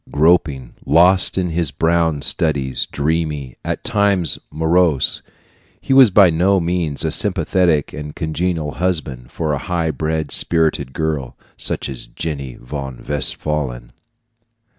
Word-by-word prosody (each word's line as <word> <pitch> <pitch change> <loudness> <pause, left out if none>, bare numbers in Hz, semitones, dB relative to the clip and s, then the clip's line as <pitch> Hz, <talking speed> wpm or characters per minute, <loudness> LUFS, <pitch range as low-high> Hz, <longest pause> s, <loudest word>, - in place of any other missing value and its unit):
Groping, 75 -5 +1
lost 90 +6 +4
in 90 -3 -1 0.2
brown 80 -3 +1
studies, 70 -6 0
dreamy, 75 -3 -2
at - - -4
times 100 -5 +1
morose, 80 -2 +2 0.6
he - - -1
was 130 -3 +8
by 95 -2 +5
no 95 +4 +2
means 85 -4 -1
a - - 0
sympathetic 85 -6 +1
and 75 0 -7
congenial 80 -1 -2
husband 80 -9 -3
for 80 -2 -2
a 70 - -2
high 85 +1 -1
bred, 80 -1 -3
spirited 80 -5 +1
girl, 80 -6 -3 0.2
such - - -2
as 65 -2 -7
Jenny 70 -6 -5
von 65 -1 -8
Westphalen. 70 -3 -2
80 Hz, 120 wpm, -18 LUFS, 70-85 Hz, 0.6 s, was